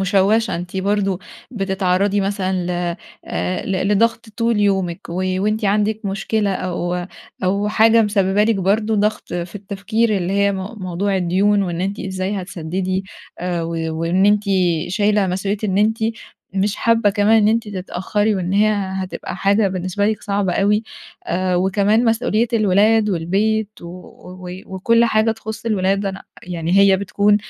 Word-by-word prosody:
مُشوَّشَة، 200 Hz, +4 st, +2 dB
أنتِ 175 Hz, +2 st, -6 dB
برضه 195 Hz, -1 st, 0 dB, 0.3 s
بتتعرضي 195 Hz, -2 st, 0 dB
مثلًا 195 Hz, -1 st, -1 dB
ل -, -, -2 dB, 0.5 s
آآ 90 Hz, +2 st, -3 dB
ل 190 Hz, 0 st, -1 dB
لضغط 225 Hz, +2 st, +1 dB
طول 230 Hz, -2 st, +1 dB
يومِك، 190 Hz, -5 st, 0 dB
و -, -, -6 dB, 0.3 s
وأنتِ 215 Hz, +1 st, 0 dB
عندِك 210 Hz, +2 st, +1 dB
مشكلة 200 Hz, +1 st, -1 dB
أو 180 Hz, -1 st, -3 dB, 0.4 s
أو 200 Hz, +3 st, +1 dB
حاجة 225 Hz, +1 st, +5 dB
مسببه 205 Hz, -1 st, +2 dB
لِك 225 Hz, +1 st, +2 dB
برضه 210 Hz, +4 st, +1 dB
ضغط 210 Hz, +1 st, -1 dB
في 175 Hz, +1 st, -4 dB
التفكير 205 Hz, +2 st, -1 dB
اللي 185 Hz, 0 st, -2 dB
هي 200 Hz, 0 st, +2 dB
م -, -, -3 dB, 0.3 s
موضوع 190 Hz, +2 st, -1 dB
الديون، 195 Hz, +3 st, +2 dB
وإن 175 Hz, -2 st, -3 dB
أنتِ 195 Hz, +2 st, -2 dB
إزاي 190 Hz, +1 st, -3 dB
هتسدِّدي 185 Hz, +2 st, -3 dB, 0.3 s
آآ 175 Hz, -1 st, -2 dB
و 165 Hz, -, -4 dB, 0.3 s
وإن 180 Hz, +4 st, +2 dB
أنتِ 210 Hz, 0 st, +3 dB, 0.4 s
شايلة 205 Hz, +1 st, +2 dB
مسؤوليّة 195 Hz, +3 st, -2 dB
إن 190 Hz, -1 st, 0 dB
أنتِ 220 Hz, +2 st, +2 dB, 0.6 s
مش 195 Hz, +1 st, 0 dB
حابة 230 Hz, -2 st, +3 dB
كمان 210 Hz, +2 st, +3 dB
إن 210 Hz, -, +4 dB
أنتِ 225 Hz, 0 st, 0 dB
تتأخري، 205 Hz, +2 st, -1 dB
وإن 185 Hz, 0 st, -2 dB
هي 210 Hz, +2 st, +4 dB
هتبقى 190 Hz, -2 st, -4 dB
حاجة 200 Hz, +1 st, +2 dB
بالنسبة 185 Hz, +2 st, -1 dB
لِك 215 Hz, 0 st, -1 dB
صعبة 200 Hz, -2 st, 0 dB
أوي، 205 Hz, +3 st, +2 dB, 0.4 s
آآ 180 Hz, +1 st, 0 dB
وكمان 200 Hz, +5 st, +2 dB
مسؤوليّة 225 Hz, 0 st, +1 dB
الولاد 215 Hz, 0 st, +3 dB
والبيت 200 Hz, +5 st, 0 dB
و 180 Hz, +1 st, -11 dB, 0.2 s
وكل 230 Hz, +5 st, +2 dB
حاجة 220 Hz, 0 st, +2 dB
تخُص 220 Hz, 0 st, -8 dB
الولاد 195 Hz, -1 st, +1 dB
أنا 195 Hz, 0 st, -5 dB, 0.2 s
يعني 175 Hz, +1 st, 0 dB
هي 200 Hz, -1 st, +6 dB
بتكون 205 Hz, +1 st, +2 dB
200 Hz, 150 wpm, -19 LUFS, 185-210 Hz, 0.6 s, هي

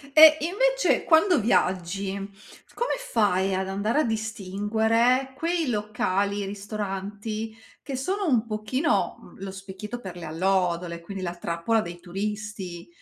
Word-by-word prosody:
E 310 Hz, 0 st, +10 dB
invece -, -, +2 dB
quando 335 Hz, +2 st, +5 dB
viaggi, 190 Hz, -2 st, +1 dB, 0.6 s
come 485 Hz, -, 0 dB, 0.2 s
fai 195 Hz, -4 st, +2 dB
ad 190 Hz, 0 st, -1 dB
andare 210 Hz, +8 st, +1 dB
a -, -, +2 dB
distinguere 220 Hz, +4 st, +1 dB
quei 330 Hz, 0 st, 0 dB
locali, 205 Hz, -2 st, 0 dB
ristoranti, 205 Hz, +2 st, -4 dB, 0.3 s
che 275 Hz, -, -6 dB
sono 380 Hz, +9 st, -1 dB
un 245 Hz, -8 st, +3 dB
pochino, 215 Hz, +7 st, 0 dB
uhm, -, -, -16 dB
lo 195 Hz, 0 st, -5 dB
specchietto 195 Hz, +4 st, -7 dB
per 185 Hz, -5 st, -8 dB
le 175 Hz, -, -7 dB
allodole, 175 Hz, 0 st, 0 dB
quindi 190 Hz, +3 st, -7 dB
la 175 Hz, -1 st, -3 dB
trappola 175 Hz, +6 st, 0 dB
dei 175 Hz, -1 st, -7 dB
turisti? 195 Hz, -1 st, -5 dB
205 Hz, 130 wpm, -26 LUFS, 190-235 Hz, 0.6 s, E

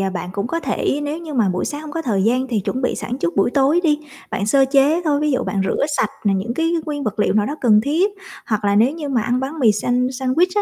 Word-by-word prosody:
ờ, 195 Hz, 0 st, 0 dB
bạn 180 Hz, -1 st, -5 dB
cũng 200 Hz, +2 st, -2 dB
có 330 Hz, +7 st, -2 dB
thể 275 Hz, 0 st, -1 dB
nếu 290 Hz, +2 st, -3 dB
như 325 Hz, -3 st, -7 dB
mà 225 Hz, -6 st, +2 dB
buổi 180 Hz, 0 st, -1 dB
sáng 290 Hz, -, -4 dB
hông 310 Hz, -1 st, -8 dB
có 330 Hz, -, -3 dB
thời 205 Hz, -8 st, 0 dB
gian 250 Hz, +5 st, +1 dB
thì 220 Hz, -5 st, 0 dB
chuẩn 255 Hz, +7 st, -3 dB
bị -, -, 0 dB
sẵn 250 Hz, +3 st, -5 dB
trước 170 Hz, +3 st, -2 dB
buổi 195 Hz, -, +3 dB
tối 280 Hz, +5 st, +3 dB
đi. 300 Hz, -3 st, +2 dB, 0.3 s
Bạn 200 Hz, -, -2 dB
sơ 270 Hz, +5 st, +4 dB
chế 285 Hz, +5 st, +3 dB
thôi, 290 Hz, -2 st, +1 dB
ví 300 Hz, 0 st, +1 dB
dụ 255 Hz, -, 0 dB
bạn 200 Hz, -, -2 dB
rửa -, -, 0 dB
sạch 215 Hz, -, +1 dB
nè 200 Hz, -2 st, +3 dB
những 205 Hz, +5 st, -2 dB
cái 330 Hz, +3 st, 0 dB
nguyên 290 Hz, -2 st, -3 dB
vật 215 Hz, -2 st, -3 dB
liệu -, -, +2 dB
nào 210 Hz, -1 st, +2 dB
đó 290 Hz, -, -3 dB
cần 215 Hz, -4 st, +5 dB
thiết 335 Hz, +8 st, +2 dB, 0.4 s
hoặc 215 Hz, -1 st, -1 dB
là 200 Hz, 0 st, +2 dB
nếu 230 Hz, +5 st, +4 dB
như 305 Hz, -1 st, -6 dB
mà 250 Hz, -5 st, +1 dB
ăn 245 Hz, +3 st, 0 dB
bánh 275 Hz, +5 st, -4 dB
mì 235 Hz, -7 st, +4 dB
sand 250 Hz, +5 st, -1 dB
sandwich 330 Hz, +8 st, +2 dB
255 Hz, 290 wpm, -20 LUFS, 215-295 Hz, 0.4 s, cần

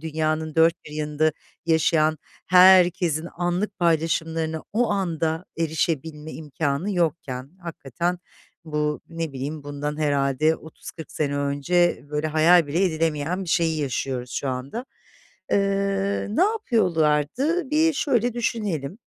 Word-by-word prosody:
dünyanın 155 Hz, 0 st, -2 dB
dört 165 Hz, +1 st, +5 dB
bir -, -, -11 dB
yanında 150 Hz, +1 st, 0 dB, 0.3 s
yaşayan 160 Hz, -1 st, +2 dB, 0.3 s
herkesin 180 Hz, -3 st, +5 dB
anlık 180 Hz, +4 st, -1 dB
paylaşımlarına 160 Hz, -1 st, 0 dB
o 235 Hz, +2 st, +1 dB
anda 165 Hz, -4 st, -1 dB
erişebilme 160 Hz, -1 st, -2 dB
imkânı 150 Hz, +4 st, -2 dB
yokken?” 145 Hz, -6 st, -2 dB
Hakikaten 170 Hz, +1 st, -3 dB, 0.5 s
bu, 150 Hz, -1 st, -1 dB
ne 165 Hz, -2 st, -4 dB
bileyim, 140 Hz, +3 st, -5 dB
bundan 145 Hz, +1 st, -4 dB
herhâlde 145 Hz, +1 st, +2 dB
30-40 160 Hz, +1 st, -11 dB
sene 145 Hz, -2 st, -1 dB
önce 145 Hz, +6 st, +1 dB
böyle 150 Hz, +1 st, -1 dB
hayal 160 Hz, +2 st, +5 dB
bile 165 Hz, +7 st, +1 dB
edilemeyen 165 Hz, +1 st, -1 dB
bir -, -, -9 dB
şeyi 160 Hz, -1 st, +1 dB
yaşıyoruz 130 Hz, -2 st, -3 dB
şu 135 Hz, -, -3 dB
anda. 130 Hz, -, -4 dB, 0.7 s
Eee, 195 Hz, 0 st, 0 dB
ne 230 Hz, +12 st, +2 dB
yapıyorlardı? 235 Hz, -, +1 dB
Bir 320 Hz, +2 st, +3 dB
şöyle 245 Hz, -6 st, +1 dB
düşünelim. 205 Hz, -, -2 dB
160 Hz, 115 wpm, -24 LUFS, 150-180 Hz, 0.7 s, dört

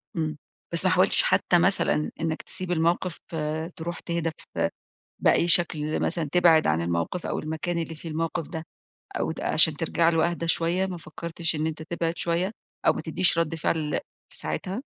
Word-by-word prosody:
امم، 155 Hz, -2 st, -2 dB, 0.4 s
بس -, -, +6 dB
ما -, -, +4 dB
حاولتش -, -, +5 dB
حتى -, -, +3 dB
مثلًا 75 Hz, +1 st, +2 dB
إنك 160 Hz, -1 st, -2 dB
تسيب 185 Hz, -1 st, -3 dB
الموقف؟ 170 Hz, +1 st, 0 dB, 0.2 s
آآ 155 Hz, +1 st, -2 dB
تروح 170 Hz, +1 st, -5 dB
تهدى 170 Hz, -1 st, -2 dB, 0.3 s
ف -, -, -4 dB, 0.6 s
بأي 170 Hz, -, +3 dB
شكل 155 Hz, -3 st, +4 dB
مثلًا، 160 Hz, -4 st, -1 dB
تبعد 170 Hz, -3 st, +5 dB
عن 80 Hz, +2 st, +1 dB
الموقف 85 Hz, -, -2 dB
أو -, -, -2 dB
المكان 160 Hz, +3 st, -3 dB
اللي 165 Hz, -1 st, -4 dB
فيه 165 Hz, +2 st, -9 dB
الموقف 165 Hz, 0 st, -3 dB
ده، 160 Hz, -1 st, -6 dB, 0.6 s
أو -, -, -1 dB
ت -, -, -7 dB
عشان 160 Hz, -1 st, +4 dB
ترجع 165 Hz, +1 st, +1 dB
له 165 Hz, 0 st, +2 dB
اهدى 170 Hz, -1 st, -4 dB
شوية، 170 Hz, +3 st, +1 dB
ما 180 Hz, -2 st, -5 dB
فكرتش 165 Hz, +1 st, -3 dB
إن 155 Hz, +1 st, -1 dB
أنت 160 Hz, 0 st, -5 dB
تبعد 165 Hz, +1 st, -3 dB
شوية، 175 Hz, +4 st, 0 dB, 0.4 s
أو -, -, +6 dB
ما -, -, -5 dB
تدّيش 170 Hz, +1 st, +4 dB
رد 165 Hz, -1 st, 0 dB
فعل 155 Hz, -1 st, -1 dB, 0.3 s
في -, -, -2 dB
ساعتها؟ 195 Hz, +7 st, -3 dB
165 Hz, 180 wpm, -25 LUFS, 155-170 Hz, 0.6 s, بس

